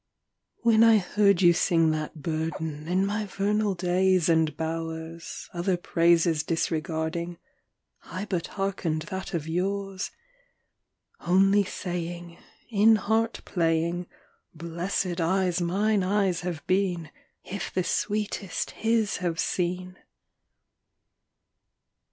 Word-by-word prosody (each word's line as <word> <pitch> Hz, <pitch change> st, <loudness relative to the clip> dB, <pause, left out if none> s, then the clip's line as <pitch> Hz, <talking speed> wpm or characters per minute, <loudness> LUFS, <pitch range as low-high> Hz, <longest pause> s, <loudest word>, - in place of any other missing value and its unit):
II. -, -, -40 dB
When 220 Hz, 0 st, +6 dB
I 225 Hz, -1 st, +7 dB
heard 200 Hz, -1 st, +2 dB
you 175 Hz, 0 st, +7 dB
sing 165 Hz, -2 st, +3 dB
that 155 Hz, -1 st, -4 dB
burden 160 Hz, -1 st, -3 dB
In 185 Hz, +3 st, +2 dB
my 210 Hz, +1 st, -2 dB
vernal 205 Hz, +1 st, 0 dB
days 180 Hz, 0 st, +2 dB
and 160 Hz, -2 st, +2 dB
bowers, 165 Hz, 0 st, -5 dB
Other 180 Hz, +1 st, 0 dB
praises 170 Hz, -2 st, +3 dB
disregarding, 165 Hz, +1 st, -2 dB, 0.7 s
I 185 Hz, +3 st, -5 dB
but 180 Hz, -5 st, -2 dB
hearkened 185 Hz, -5 st, -1 dB
that 190 Hz, -1 st, -4 dB
of 160 Hz, -2 st, -3 dB
yours 195 Hz, +3 st, -2 dB, 1.1 s
Only 195 Hz, +3 st, +4 dB
saying 175 Hz, -2 st, -5 dB, 0.3 s
In 220 Hz, +1 st, +6 dB
heart 220 Hz, +2 st, 0 dB
playing, 170 Hz, 0 st, 0 dB, 0.5 s
"Blessed 170 Hz, +2 st, -2 dB
eyes 180 Hz, +1 st, +1 dB
mine 200 Hz, +4 st, +1 dB
eyes 190 Hz, -2 st, +1 dB
have 175 Hz, -4 st, -5 dB
been, 180 Hz, -5 st, 0 dB, 0.3 s
If 200 Hz, +2 st, -5 dB
the 185 Hz, -, 0 dB
sweetest 205 Hz, -2 st, -2 dB
HIS 225 Hz, -2 st, 0 dB
have 175 Hz, -2 st, -2 dB
seen!" 180 Hz, +1 st, -2 dB
180 Hz, 110 wpm, -27 LUFS, 165-195 Hz, 1.1 s, I